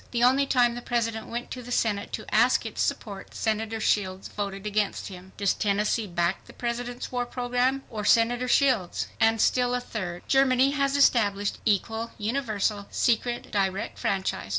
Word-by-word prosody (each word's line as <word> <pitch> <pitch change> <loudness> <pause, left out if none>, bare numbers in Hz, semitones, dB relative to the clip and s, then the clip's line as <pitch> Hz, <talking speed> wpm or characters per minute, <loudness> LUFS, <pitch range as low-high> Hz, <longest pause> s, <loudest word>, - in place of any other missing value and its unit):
THE 240 -1 0
ONLY 270 +3 +4
TIME 245 -3 +3
THE 240 - -6
PRESIDENT 230 -2 -2
WENT 240 +1 -5
TO 255 - -5
THE 245 0 -10
SENATE 210 -4 0
TO - - -5
ASK - - +4
ITS - - -4
SUPPORT 200 -4 -3
SENATOR 220 0 -1
SHIELDS 190 -3 0
VOTED 200 -1 -5
AGAINST 210 -1 -1
HIM. 185 0 -11
DOES 200 -2 +2
TENNESSEE 210 +2 0
BACK 175 0 -1
THE - - -14
PRESIDENT'S 245 +1 -4
WAR 245 -1 -1
PROGRAM 250 +2 0
OE 215 -2 -4
SENATOR 235 +4 +3
SHIELDS? 250 -9 +2
And 225 0 +3
still 245 +2 +2
a - - 0
third: 185 -8 -5
GERMANY 270 0 +4
HAS 275 -1 +1
ESTABLISHED 205 -7 +2
"EQUAL, 225 +3 0
UNIVERSAL, 215 -3 -1
SECRET, 240 +1 0
DIRECT 195 0 -1
FRANCHISE." 190 - -1
225 Hz, 165 wpm, -26 LUFS, 200-245 Hz, -, ONLY